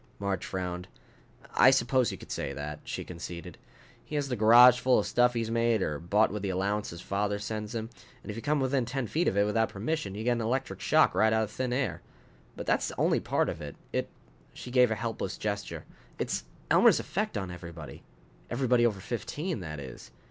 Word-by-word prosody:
Marge 100 -1 -2
frowned. 90 -1 -4 0.7
"I 130 - +7
suppose 130 -1 +2
you - - -6
could - - -12
say - - -3
that," 75 +1 -6
she - - -5
conceded. 85 0 -8 0.4
"He 150 - -7
has 145 -2 -1
the 125 - 0
garage 120 +3 +8
full 125 0 +4
of - - +1
stuff 125 0 +3
he's 115 -1 -1
made 115 -3 +2
or 75 -1 -2
bought 105 +6 +2
with 105 0 -4
the 100 - -2
allowance 100 +3 -1
his 85 +1 -8
father 100 +1 -1
sends 105 +2 -5
him. 115 0 -4 0.3
And - - -6
if - - -7
you 115 - -5
come 150 +2 +1
within 130 -1 +1
ten 125 +2 -3
feet 165 +9 0
of 100 - +1
it 100 - +5
without 110 +2 +1
permission, 105 -1 -3
you 110 - -4
get 125 - +2
an 120 -1 0
electric 125 +4 -2
shock - - +4
right 110 0 +3
out 110 0 +2
of 105 - -5
thin 130 +2 -2
air. 120 -10 -1 0.5
But - - -6
that's - - +1
only - - +3
part - - 0
of 80 - -4
it. 75 -1 -7 0.2
It - - -1 0.2
" - - -31
she 125 - -8
gave 125 -1 +5
a 110 - 0
helpless 115 +1 -4
gesture 105 -1 -4 0.3
"it's - - -2 0.3
Elmer's - - +6
effect - - -2
on 95 -3 -4
everybody. 85 -3 -9 0.5
Everybody 120 -1 +3
over 105 -4 -3
fifteen, 145 - -3
that 75 -4 -6
is. 65 -3 -9
110 Hz, 215 wpm, -29 LUFS, 95-125 Hz, 0.7 s, garage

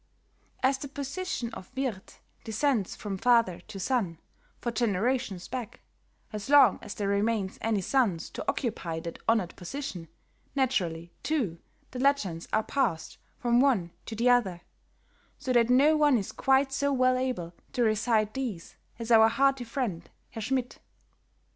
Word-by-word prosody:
As 265 +1 +3
the 285 - -5
position 280 -3 -4
of 185 - -9
Wirthe 255 -8 -4 0.2
descends 225 -2 0
from 195 -3 -5
father 230 -7 +3
to 210 -2 -8
son, 195 -7 0 0.4
for 240 - -2
generations 220 -3 0
back, 245 -4 -6 0.5
as 210 +3 -5
long 280 -7 +7
as - - -7
there 205 - -2
remains 200 -1 0
any 220 -3 +1
sons 200 -6 +1
to - - -5
occupy 175 -9 -2
that 170 0 -7
honored 220 -7 +1
position, 185 - -6 0.5
naturally, 175 -11 0
too, 230 - -1 0.3
the 255 - -6
legends 230 -12 +1
are 215 - +2
passed 215 - -1 0.2
from 240 0 +2
one 235 -11 +2 0.2
to 225 - -5
the 235 +3 +1
other, 195 -8 +2 0.8
so 255 - -2
that 240 -1 +4
no 280 +5 +5
one 295 -4 +4
is 200 - -3
quite 270 0 +2
so 280 +1 +1
well 255 -1 +3
able 250 -10 -2 0.2
to 250 -3 +1
recite 215 -1 +2
these 235 -11 -5 0.2
as 230 0 -5
our 225 -1 +7
hearty 270 +2 +2
friend 225 -9 -3 0.2
Herr 225 - -6
Schmidt. 255 +2 -2
230 Hz, 150 wpm, -28 LUFS, 195-265 Hz, 0.8 s, long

